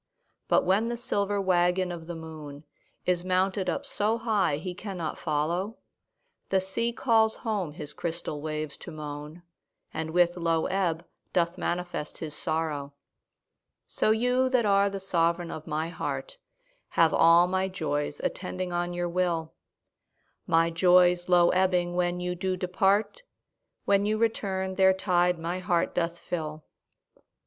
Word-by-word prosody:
But - - +3
when 200 +5 +2
the 240 - -3
silver 205 -5 0
waggon 180 -1 +2
of 165 -2 -7
the 175 - -5
moon 155 -3 -9 0.4
Is 180 -1 +1
mounted 185 +1 +1
up - - -2
so 215 +2 0
high 205 -10 +1
he 180 +4 -5
cannot 180 -4 -5
follow, 170 +7 -1 0.7
The 190 - +3
sea 190 +5 -1
calls 225 -2 +2
home 200 -9 -1
his 150 -2 -8
crystal 165 -3 -4
waves 155 -1 -4
to - - -10
moan, 150 +1 -7 0.5
And 160 0 -3
with 175 +1 +3
low 165 -2 +1
ebb 175 -3 -1 0.3
doth 170 -1 +1
manifest 175 -3 -3
his 155 -2 -6
sorrow. 150 -3 -3 0.9
So - - 0
you 250 +4 +2
that 250 -3 +2
are 200 0 +4
the 195 0 -5
sovereign 170 -2 0
of 155 - -8
my 160 +1 -2
heart - - -5 0.6
Have 165 -1 +5
all 170 +1 +6
my 190 +1 0
joys 150 -6 -2
attending 185 -1 -3
on 175 0 -1
your 175 0 -1
will; 170 -2 -1 0.9
My 165 0 +3
joys 180 +1 +4
low 175 -1 +6
ebbing 180 -1 +2
when 175 0 0
you 180 0 -2
do 185 +1 -2
depart, 195 - +1 0.6
When 200 0 +3
you 215 +1 +1
return 195 -4 -1
their 190 -1 +6
tide 180 -2 +2
my 170 +2 -3
heart 175 -2 0
doth 170 0 -1
fill. 155 -3 -5
180 Hz, 145 wpm, -28 LUFS, 165-190 Hz, 0.9 s, all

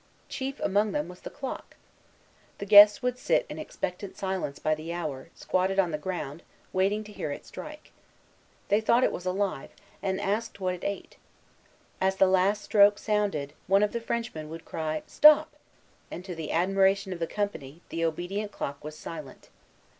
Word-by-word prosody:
Chief 270 +1 -4
among 205 +1 +1
them 150 +2 -1
was 180 0 -11
the - - -8
clock. 270 -2 -7 0.8
The 200 - -5
guests 205 +3 +9
would 250 0 -1
sit - - +2
in - - -6
expectant 185 +2 -5
silence 190 -7 -3
by 155 - +1
the 155 +2 -5
hour, 155 -5 -5
squatted 185 +1 0
on 185 -3 +3
the 150 - -3
ground, 165 -3 -5 0.3
waiting 195 +3 +1
to 210 - -12
hear 180 - -4
it - - -7
strike. 305 0 -10 0.8
They 205 +2 +3
thought 235 +3 +3
it - - +3
was 180 - -6
alive, 185 -6 -1 0.3
and 190 -1 -1
asked 205 +2 -2
what 185 -1 0
it 180 - -8
ate. 200 -1 -5 0.8
As 190 0 +2
the 190 - +5
last 190 +2 +2
stroke 205 -1 +5
sounded, 205 -10 -1
one 195 +2 +4
of 210 - +1
the 235 - -3
Frenchmen 225 -10 -4
would 165 +1 -9
cry 155 -1 -3
"Stop!" 300 0 +6 0.6
and, 180 - -8
to 185 - -5
the 160 -2 -5
admiration 195 +2 +2
of 175 - -8
the 165 - -1
company, 170 -8 -4
the 165 - -2
obedient 175 +6 -2
clock 140 -6 -5
was 155 0 -7
silent. 155 -5 -9
190 Hz, 175 wpm, -28 LUFS, 165-205 Hz, 0.8 s, guests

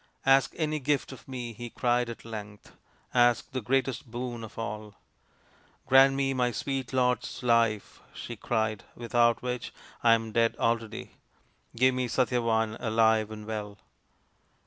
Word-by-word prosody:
" - - -44
Ask 135 0 +4
any 155 -1 -1
gift 140 0 0
of 130 - -12
me," 125 -3 -5
he 120 +2 -7
cried 120 0 +1
at 115 - -8
length. 105 -2 -9 0.2
" - - -36
Ask 120 -1 +3
the 130 - -3
greatest 130 +1 -1
boon 120 0 -5
of 110 - -10
all" 105 -2 -5 0.5
" - - -33
Grant 135 +1 +6
me 135 0 +1
my 125 -1 +1
sweet 135 +1 -3
lord's 125 -1 0
life," 115 -3 +1
she - - -7
cried, 110 -3 -1
" - - -31
without 120 -1 +2
which 125 -1 -3 0.3
I 115 -1 +6
am 115 -1 -4
dead 115 +1 +2
already. 115 -1 -2 0.6
Give 130 +2 +4
me 125 0 -1
Satyavan, 115 -3 +1
alive 110 -2 +2
and 105 -1 -8
well." 105 -2 -5
120 Hz, 160 wpm, -28 LUFS, 110-130 Hz, 0.6 s, Grant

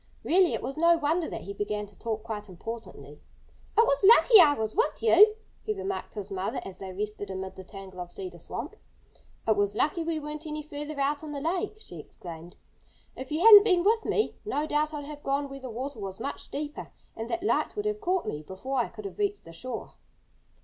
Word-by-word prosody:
Really 365 +1 +4
it - - -5
was 270 - -4
no 335 +1 +5
wonder 320 +2 0
that - - -5
he 200 - -6
began 210 +1 -3
to 205 0 -18
talk 220 +1 -4
quite 210 -2 -6
importantly. 225 +6 -9 0.6
"It 455 - +7
was 280 -2 +1
lucky 450 +1 +8
I 295 -3 +6
was 220 -3 -3
with 460 +1 0
you," 425 -1 +7 0.3
he 430 - -2
remarked 390 -1 -4
to 210 - -4
his 200 +1 -11
mother 190 0 -2
as 190 - -9
they 190 -1 -6
rested 205 +1 -5
amid 190 0 -5
the 190 - -9
tangle 190 -1 -10
of 175 -1 -5
Cedar 180 -2 -7
Swamp. 265 - -6 0.7
"It 220 - +4
was 205 0 +1
lucky 330 +3 +1
we 325 -1 -1
weren't 300 +1 -6
any 305 0 -4
further 295 0 -6
out 285 +1 +1
in 305 -2 -7
the 285 - -3
lake," 365 +8 -1
she - - -10
exclaimed. 170 0 -10 0.6
"If 260 +1 -8
you 310 +2 0
hadn't 415 -1 +11
been 365 -5 +3
with 445 +3 +3
me 430 - +1
no 355 -8 -1
doubt 300 0 0
I'd 295 -2 -5
have 295 0 -8
gone 280 +1 -1
where 275 0 -8
the 260 -1 -7
water 255 +2 -5
was 195 -1 -6
much 275 +5 -5
deeper. 295 +1 -5 0.2
And 225 +1 -5
that 345 +5 -2
light - - +1
would 415 0 -3
have 425 0 -1
caught 370 -3 0
me 150 - -4
before 220 - -4
I 240 - +1
could 215 -2 -10
have 195 - -7
reached 410 0 -1
the 165 - -11
shore." 245 +7 -6
280 Hz, 225 wpm, -28 LUFS, 205-340 Hz, 0.7 s, hadn't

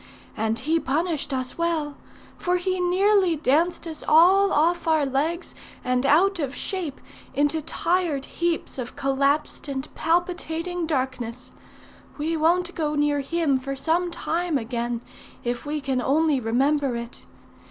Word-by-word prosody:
And 220 0 0
he 315 +7 +1
punished 310 +1 -1
us 255 +3 -3
well; 320 -4 0 0.4
for 360 0 0
he 370 +1 -1
nearly 370 0 +3
danced 315 +4 +1
us 320 -2 -6
all 375 +6 +6
off 335 +3 +2
our 315 -2 +3
legs 300 +6 -1 0.3
and 250 +1 +1
out 360 +6 +4
of 280 -3 -2
shape 350 -8 -4 0.4
into 290 +3 +1
tired 330 -2 0
heaps 340 -5 -2
of 245 -1 -5
collapsed 280 +2 0
and 270 0 -5
palpitating 350 0 -1
darkness. 255 -4 -3 0.7
We 315 +2 -1
won't 345 +3 +2
go 300 -2 -1
near 290 0 +2
him 285 -1 +1
for 275 +1 -4
some 330 +6 0
time 335 -1 -1
again, 235 -1 -3 0.4
if 240 +3 -3
we 300 +1 -1
can 265 -2 -1
only 295 +2 +2
remember 265 +3 +1
it. 235 0 -7
300 Hz, 140 wpm, -24 LUFS, 270-340 Hz, 0.7 s, all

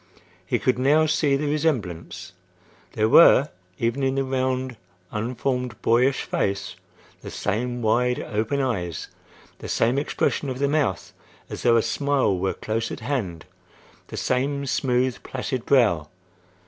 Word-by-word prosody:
He - - 0
could 125 -1 0
now 150 +4 +4
see 150 -2 +2
the 145 +2 -1
resemblance. 95 - -2 0.6
There 110 0 +2
were, 145 +2 +7 0.3
even 120 +4 -1
in 135 0 +1
the 135 - +1
round, 130 -1 -1 0.4
unformed, 125 +2 -2
boyish 125 +3 +3
face, 100 0 -2 0.5
the - - -8
same 120 +4 -2
wide 125 +3 +2
open 115 +6 -1
eyes; 90 - -3 0.5
the - - -8
same 120 +4 +2
expression 145 -1 -1
of 130 - -4
the 140 +1 +1
mouth, 145 - -1 0.4
as - - -5
though 120 -1 +4
a 115 - +2
smile 140 -8 +1
were 95 +1 -1
close 110 +1 -3
at - - -6
hand; 110 - -3 0.6
the - - -8
same 140 +2 -1
smooth, 125 -1 0
placid 130 -1 -4
brow. 105 - +3
125 Hz, 140 wpm, -24 LUFS, 110-135 Hz, 0.6 s, were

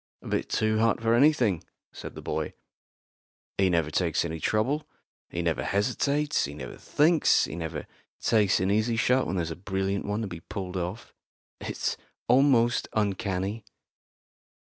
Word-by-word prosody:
"A - - -9
bit - - -1
too 110 0 +1
hot 115 0 +3
for 115 0 +2
anything," 120 - +3 0.3
said - - -8
the - - -8
boy. - - -2 1.1
"He 95 -1 +4
never 85 -3 +1
takes 85 -1 +1
any 80 -1 -4
trouble; 125 - 0 0.4
he 85 - -3
never 85 -2 0
hesitates; 140 +8 +1
he 70 +1 -7
never 65 -4 -7
thinks; 160 +2 +3
he 70 - -6
never 80 -2 -4 0.3
takes 105 -4 +3
an 95 +2 +1
easy 110 +3 +2
shot 125 +3 +2
when 95 - -2
there's 85 -3 -1
a - - -4
brilliant 95 +2 -2
one 105 +2 -1
to 110 - -2
be 85 -3 -7
pulled 95 +1 -6
off. 90 +5 -4 0.5
It's - - -2 0.3
almost 125 -2 +4
uncanny." 100 0 -1
100 Hz, 155 wpm, -27 LUFS, 90-115 Hz, 1.1 s, He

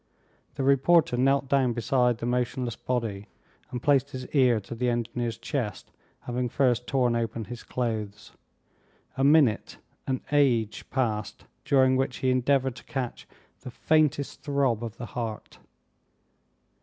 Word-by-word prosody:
The 135 - -2
reporter 140 +2 +4
knelt 135 +2 +2
down 130 -3 +2
beside 125 0 +1
the 115 - -5
motionless 125 -1 -1
body, 110 -5 -3 0.4
and 125 -1 -6
placed 140 -1 +3
his 130 -2 -6
ear 125 -5 +3
to 100 - -9
the 125 +1 -1
engineer's 120 -1 -2
chest, 115 -4 -4 0.3
having 125 0 -2
first 125 -2 +1
torn 125 -3 +1
open 115 -1 -2
his 120 +1 -8
clothes. 110 -4 -4 0.8
A 135 - 0
minute 140 -6 +3 0.3
an 130 -1 -1
age! 125 -7 +1
passed, 110 -5 -2 0.2
during 130 -2 +4
which 130 -1 -1
he 130 - +1
endeavored 130 0 +1
to - - -11
catch 130 -3 -5 0.3
the - - -9
faintest 150 +1 +1
throb 140 -6 0
of 115 -1 -6
the 120 - -6
heart. 110 0 -6
125 Hz, 140 wpm, -27 LUFS, 115-135 Hz, 0.8 s, reporter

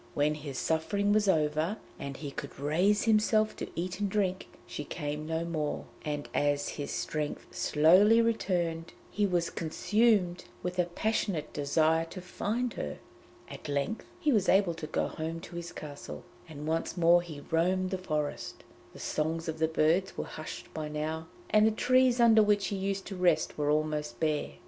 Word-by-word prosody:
When 150 +1 +2
his 145 -3 -6
suffering 200 +8 +1
was 210 -1 +3
over, 155 +3 +1 0.2
and 140 -1 -5
he 145 -3 -6
could 140 0 -8
raise 180 +9 +2
himself 215 -1 +3
to - - -5
eat 180 +2 -3
and 205 -1 0
drink, 190 -2 0 0.2
she 150 - -5
came 150 0 -4
to 160 - -3
him 165 - 0
no - - -5
more, 155 -3 -2 0.2
and 145 -1 -3
as 145 0 +1
his 145 - -5
strength 150 -1 -3
slowly 185 +9 +5
returned 175 -8 0 0.2
he 205 -1 +1
was 175 -2 0
consumed 185 +1 +1 0.2
with 180 +1 -3
a 180 - +4
passionate 180 -2 -1
desire 160 +3 +2
to 175 +3 -9
find 220 +6 -2
her. 75 -1 -4 0.5
At - - -9
length 145 +10 -2
he 305 -4 +2
was 205 -4 +2
able 190 -2 +4
to 160 -2 -6
go - - 0
home 160 +1 -4
to 170 - -10
his 170 0 -5
castle, 145 -2 -8 0.3
and 150 -1 -7
once 165 +3 -1
more 175 0 +6
he 155 -4 -9
roamed 185 +3 +2
the 190 - -2
forest. 150 -5 -3 0.3
The - - -12
songs 160 +2 -2
of 160 0 -3
the 160 - +3
birds 160 +4 +1
were - - -1
hushed 155 - -8
by 155 -1 -4
now, 155 +2 -3 0.2
and 215 0 +6
the - - +3
trees 255 +2 +3
under 225 -2 +7
which 205 -2 +2
he 200 - -2
used 195 0 -2
to 195 - -6
rest 180 -3 +2
were 145 -1 0
almost 150 -5 0
bare. 155 -2 0
170 Hz, 180 wpm, -30 LUFS, 155-200 Hz, 0.5 s, under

